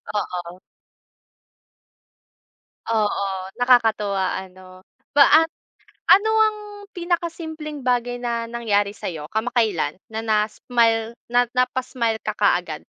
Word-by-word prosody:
oo. 180 Hz, -3 st, -4 dB, 2.3 s
Oo. 215 Hz, -3 st, +1 dB, 0.4 s
Nakakatuwa 220 Hz, -6 st, +3 dB
ano? 185 Hz, 0 st, -14 dB, 0.3 s
Paa 290 Hz, +3 st, +7 dB, 0.7 s
ano 415 Hz, +3 st, +6 dB
ang 430 Hz, -1 st, +1 dB, 0.3 s
pinaka 345 Hz, -1 st, -1 dB
simpleng 315 Hz, -3 st, -7 dB
bagay 245 Hz, 0 st, 0 dB
na 235 Hz, -1 st, -2 dB
nangyari 205 Hz, -4 st, 0 dB
sa 205 Hz, -, -7 dB
iyo 160 Hz, -4 st, -5 dB
kamakailan? 220 Hz, -, 0 dB, 0.2 s
Na 220 Hz, -, -3 dB
na 215 Hz, -2 st, +2 dB
smile 230 Hz, -1 st, +1 dB, 0.2 s
na 245 Hz, 0 st, +3 dB
napa-smile 250 Hz, -2 st, 0 dB
ka 215 Hz, -1 st, -4 dB
kaagad? 175 Hz, -7 st, 0 dB
230 Hz, 100 wpm, -22 LUFS, 205-250 Hz, 2.3 s, Paa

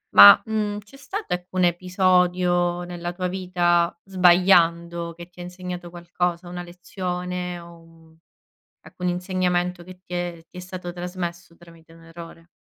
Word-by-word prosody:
Ma, 100 Hz, 0 st, +11 dB
uhm, 210 Hz, -2 st, -2 dB
c'è 210 Hz, +6 st, -16 dB
stato 330 Hz, -, -4 dB
ecco 180 Hz, +1 st, -6 dB
episodio 180 Hz, 0 st, +2 dB
nella 175 Hz, 0 st, -5 dB
tua 180 Hz, +1 st, -2 dB
vita 175 Hz, -2 st, +1 dB
sbagliando, 170 Hz, -2 st, +3 dB
che 170 Hz, +1 st, -11 dB
ti 180 Hz, 0 st, -19 dB
ha -, -, -6 dB
insegnato 180 Hz, -1 st, -7 dB
qualcosa? 175 Hz, 0 st, -3 dB
Una 175 Hz, 0 st, -6 dB
lezione 180 Hz, 0 st, -5 dB
o 165 Hz, -1 st, -16 dB, 0.6 s
alcun 180 Hz, -, -6 dB
insegnamento 180 Hz, -1 st, -1 dB
che 185 Hz, 0 st, -13 dB
ti 180 Hz, -, -10 dB
è 175 Hz, -2 st, -4 dB
ti -, -, -13 dB
è -, -, -5 dB
stato 180 Hz, -1 st, -7 dB
trasmesso 175 Hz, -1 st, -6 dB
tramite 165 Hz, -1 st, -18 dB
un 165 Hz, 0 st, -17 dB
errore? 165 Hz, 0 st, -12 dB
175 Hz, 145 wpm, -23 LUFS, 170-180 Hz, 0.6 s, Ma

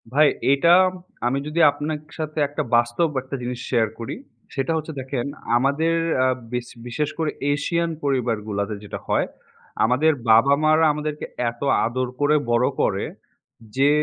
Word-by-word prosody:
ভাই, 150 Hz, +2 st, +6 dB, 0.3 s
এটা 140 Hz, +4 st, +3 dB, 0.6 s
আমি 135 Hz, +3 st, 0 dB
যদি 155 Hz, +3 st, -2 dB
আপনাক 150 Hz, +1 st, -4 dB, 0.2 s
সাথে 155 Hz, -1 st, -5 dB
একটা 145 Hz, +2 st, -3 dB
বাস্তব 120 Hz, +7 st, +2 dB
একটা 130 Hz, +2 st, -6 dB
জিনিস 125 Hz, 0 st, -4 dB
শেয়ার 115 Hz, -3 st, +2 dB
করি, 115 Hz, -, -5 dB, 0.4 s
সেটা 135 Hz, +3 st, -1 dB
হচ্ছে 160 Hz, 0 st, -5 dB
দেখেন 130 Hz, -2 st, -3 dB, 0.3 s
আমাদের 140 Hz, +6 st, +1 dB, 0.3 s
আ -, -, +4 dB, 0.3 s
বিশ 125 Hz, -1 st, -2 dB, 0.2 s
বিশেষ 145 Hz, +5 st, -1 dB
করে 160 Hz, -2 st, 0 dB, 0.2 s
এশিয়ান 170 Hz, +4 st, -1 dB
পরিবারগুলোতে 110 Hz, -6 st, -1 dB
যেটা 105 Hz, -, -6 dB
হয়। -, -, +2 dB, 0.6 s
আমাদের 130 Hz, +7 st, +3 dB, 0.2 s
বাবা-মারা 140 Hz, +7 st, +5 dB
আমাদেরকে 150 Hz, 0 st, -4 dB, 0.3 s
এত 120 Hz, -, -20 dB, 0.2 s
আদর 130 Hz, +2 st, -1 dB
করে 145 Hz, +1 st, +4 dB, 0.2 s
বড় 120 Hz, -, +3 dB, 0.2 s
করে, -, -, +1 dB, 0.7 s
যে 140 Hz, +2 st, +5 dB
140 Hz, 140 wpm, -23 LUFS, 120-155 Hz, 0.7 s, ভাই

